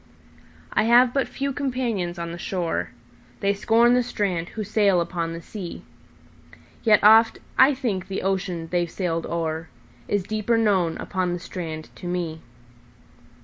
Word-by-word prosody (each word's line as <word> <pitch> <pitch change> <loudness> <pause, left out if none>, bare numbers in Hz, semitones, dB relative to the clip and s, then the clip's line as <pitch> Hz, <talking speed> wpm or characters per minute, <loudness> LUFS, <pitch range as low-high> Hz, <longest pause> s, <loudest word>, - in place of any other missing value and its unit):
I - - +2
have 245 +2 +5
but 275 -2 +1
few 275 0 -3
companions 240 -10 -2
on 170 0 -4
the 170 - -7
shore:They 165 -3 -3
scorn 225 +4 +4
the 250 - +4
strand 190 -8 -2
who 220 - -5
sail 200 -3 +3
upon 170 -1 -2
the 165 0 -8
sea; 185 -4 -7 1.0
Yet 215 -2 +4
oft 225 +2 +7 0.2
I 265 +2 +6
think 205 -8 -2
the 195 - -4
ocean 185 -3 -2
they've 175 -1 0
sailed 165 -2 -2
o'erIs 160 - -4
deeper 215 +2 0
known 190 -7 +2
upon 185 -2 -2
the 175 - -3
strand 160 -3 -6
to 175 - -7
me. 170 -3 -3
185 Hz, 145 wpm, -24 LUFS, 170-220 Hz, 1.0 s, oft